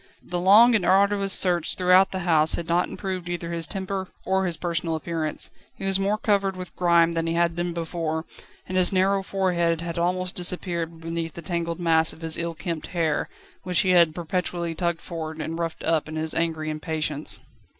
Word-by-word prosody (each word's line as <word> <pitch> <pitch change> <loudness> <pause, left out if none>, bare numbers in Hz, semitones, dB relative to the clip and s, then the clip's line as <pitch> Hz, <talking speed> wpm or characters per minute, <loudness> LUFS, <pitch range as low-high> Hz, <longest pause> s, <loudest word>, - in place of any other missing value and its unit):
The 175 - -3
long 210 +7 +7
and 215 -5 +2
arduous 195 +2 +3
search 175 -3 +3
throughout 185 +1 +5
the 190 - -4
house 160 -2 +3
had 170 - -5
not 175 +1 +1
improved 185 -2 -5
either 170 -1 -4
his 165 -2 -2
temper 190 0 -3 0.2
or 190 0 +1
his 170 -2 -1
personal 165 -1 -2
appearance. 160 -1 -4 0.2
He - - -7
was 195 0 +3
more 200 +2 +1
covered 200 -3 +1
with 180 -1 -8
grime 170 -1 +4
than 165 0 -2
he 165 - -1
had 170 0 +1
been 175 0 -2
before, 165 -1 -3 0.4
and 185 - -2
his 180 - +8
narrow 195 +1 +2
forehead 175 -4 0
had 170 0 -4
almost 180 +1 -1
disappeared 170 -2 -2
beneath 165 -1 -4
the 170 - -8
tangled 170 0 -3
mass 160 -2 +3
of 160 - -16
his 160 0 -1
ill 170 0 -3
kempt 165 -2 -4
hair, 160 -3 0 0.3
which 180 -2 +1
he 185 - +2
had 170 -3 +5
perpetually 175 0 -2
tugged 170 0 -2
forward 160 -2 -6
and 160 +2 -4
roughed 165 -1 -4
up 160 -2 0
in 155 - -6
his 160 0 -2
angry 160 -2 -1
impatience. 155 -1 -2
170 Hz, 195 wpm, -24 LUFS, 165-185 Hz, 0.4 s, his